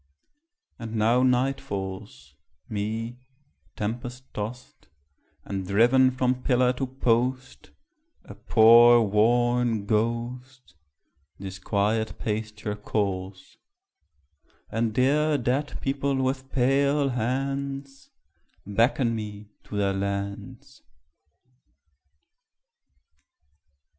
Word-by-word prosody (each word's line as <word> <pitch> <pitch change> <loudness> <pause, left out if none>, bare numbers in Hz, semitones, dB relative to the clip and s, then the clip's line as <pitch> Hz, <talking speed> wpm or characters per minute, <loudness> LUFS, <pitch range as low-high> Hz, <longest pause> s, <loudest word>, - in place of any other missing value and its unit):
And 115 -1 -6
now 115 +3 +3
night 130 +2 +1
falls, 95 - -7 0.3
Me, 110 +3 -4 0.6
tempest 120 +4 -5
tost, 110 -3 -7 0.6
and 95 -2 -4
driven 120 +6 +4
from 125 0 -1
pillar 125 -1 +2
to 130 +1 -3
post, 130 +1 -1 0.5
A - - -11
poor 120 +1 +6
worn 120 +1 +2
ghost, 120 - -3 0.6
This 95 0 -8
quiet 105 +3 -1
pasture 105 -1 -4
calls; 95 -2 -4 1.1
And 115 0 0
dear 145 +6 +2
dead 135 +4 -2
people 140 0 -1
with 130 0 -2
pale 140 +2 +2
hands 135 +3 -3 0.6
Beckon 115 +4 +1
me 105 -1 -7
to 105 - -6
their 100 -1 +1
lands. 100 +1 -5
120 Hz, 85 wpm, -26 LUFS, 105-130 Hz, 1.1 s, poor